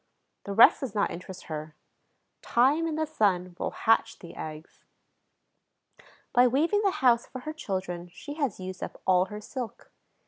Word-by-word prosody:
The 200 - -4
rest 225 - +8
does 250 -6 -5
not 205 - +1
interest 180 +2 -8
her: 155 -1 -6 0.7
time 280 +7 +3
and 315 -1 -2
the 315 - +1
sun 190 - 0
will - - -1
hatch 225 0 +1
the 170 - -12
eggs. 155 0 -9 1.5
By 245 0 +6
weaving 320 - +2
the 400 - +4 0.2
house 235 -1 +4
for 260 - -8
her 310 +4 -5
children 185 - -4
she 290 +11 -8
has 280 -10 -2
used 185 0 -7
up - - -6
all 185 -1 +4
her 210 +2 -8
silk. 240 +2 -7
215 Hz, 165 wpm, -28 LUFS, 180-275 Hz, 1.5 s, rest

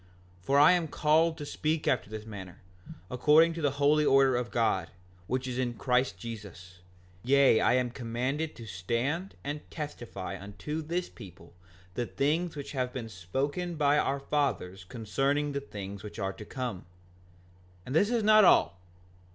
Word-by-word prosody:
5:44 90 - -27
For 140 +1 +4
I 150 +5 +8
am 175 -3 +2
called 160 +2 +2
to 145 - -6
speak 155 +2 -2
after 125 -5 +1
this 110 0 -7
manner, 95 -5 -9 0.5
according 150 +6 +5
to 165 - -5
the 145 - +3
holy 150 +2 +4
order 135 -2 +4
of 120 -1 -2
God, 110 -8 0 0.4
which 130 0 -2
is 125 0 -3
in 120 -2 -1
Christ 125 -3 +1
Jesus; 95 -4 -9 0.4
yea, 135 -3 +5
I - - +4
am 125 -1 0
commanded 130 +6 -3
to 115 - -10
stand 120 - -2
and 145 +1 -4
testify 100 - -6
unto 150 +11 -5
this 170 +3 -2
people 90 -6 -13 0.4
the 120 +3 -2
things 160 +4 0
which 145 -1 -6
have 130 -3 -2
been 120 -3 -6
spoken 135 - -3
by 150 -1 +3
our 140 -1 0
fathers 135 -11 -2
concerning 135 +8 -1
the 140 0 -3
things 100 -6 -8
which 105 - -9
are 95 0 -2
to 105 - -10
come. 125 -7 -4
5:45 - - -16 1.0
And 130 - -4
this 200 +6 +4
is 235 -2 +1
not 215 0 +7
all. 95 - +4
130 Hz, 170 wpm, -29 LUFS, 105-150 Hz, 1.0 s, I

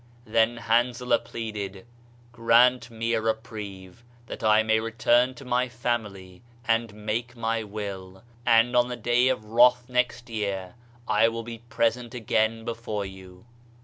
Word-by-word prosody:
Then 115 +1 +2
Hanzalah 120 +2 +1
pleaded, 105 -4 -6 0.5
"Grant 120 +1 +4
me 115 0 -2
a 115 - +1
reprieve 110 -3 -5 0.2
that - - -8
I 110 0 +5
may 110 0 +2
return 120 +3 +2
to 135 - -12
my 125 0 0
family 105 -7 -4 0.3
and 115 -1 +1
make 110 +3 -3
my 115 -1 -1
will; 100 -2 -7 0.2
and 120 +1 +4
on 120 0 +4
the 125 - -4
day 120 +2 +2
of 125 -5 -1
wrath 120 +2 +4
next 125 -1 -1
year 100 -5 -3 0.3
I - - +4
will 115 0 -3
be 115 0 -8
present 120 +1 -1
again 115 -1 0
before 115 -3 -4
you." 95 -1 -12
115 Hz, 145 wpm, -26 LUFS, 105-120 Hz, 0.5 s, I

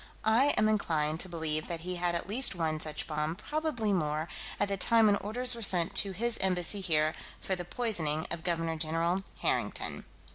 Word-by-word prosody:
I 240 +6 +3
am 215 - +3
inclined 160 -7 -1
to 185 - 0
believe 160 -2 -3
that 170 -2 -5
he 180 +1 -5
had 175 0 -1
at 170 - -3
least 235 +2 +4
one 160 -2 -2
such 155 -1 -4
bomb, 150 +1 -3
probably 245 - -3
more, 155 -2 -2 0.3
at - - +1
the 200 - -1
time 225 +4 +2
when 205 -1 +4
orders 245 +5 +3
were 235 - -5
sent 180 -5 +4
to 200 - +3
his 230 +5 +5
embassy 185 +1 +2
here, 155 -4 +1 0.3
for 190 - -3
the 175 -1 -7
poisoning 170 -8 -2
of 170 -1 -5
Governor 165 -2 -2
General 165 +4 -1 0.2
Harrington." - - -2
175 Hz, 190 wpm, -29 LUFS, 160-215 Hz, 0.3 s, his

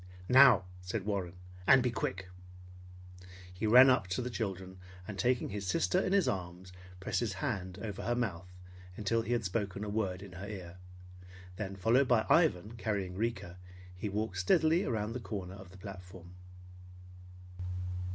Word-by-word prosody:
"Now!" 130 -6 +8 0.2
said 95 +2 -4
Warren, 100 -5 -2 0.3
"and 130 - +7
be 125 - +1
quick!" 95 -4 -3 1.3
He 90 +4 -2
ran 125 +4 +9
up 125 -7 +3
to 95 +6 -2
the 125 - -4
children, 95 -5 -4 0.3
and 100 -2 -6
taking 125 +1 +1
his 100 -1 -5
sister 165 - +2
in 190 - -1
his 195 -2 +3
arms, 90 0 -4 0.3
pressed 95 - -1
his 115 -5 -1
hand 95 -4 -3
over 105 -3 -5
her 120 - 0
mouth 90 -7 -3 0.5
until 115 +2 +1
he 115 +2 -2
had 115 -2 0
spoken 100 +1 -2
a 105 - -4
word 100 -3 -2
in 100 - -10
her 90 +4 -8
ear. 95 -4 -8 0.8
Then 100 -2 -4
followed 115 +8 +3
by 120 -3 +3
Ivan 110 - +3
carrying 100 -5 -2
Rika, 95 -4 -3 0.4
he 95 +3 -4
walked 105 -2 -2
steadily 160 - +3
round 110 -2 -2
the 125 - -4
corner 100 -4 -6
of 95 -2 -11
the 95 - -14
platform. 95 -2 -10
100 Hz, 160 wpm, -32 LUFS, 95-115 Hz, 1.3 s, ran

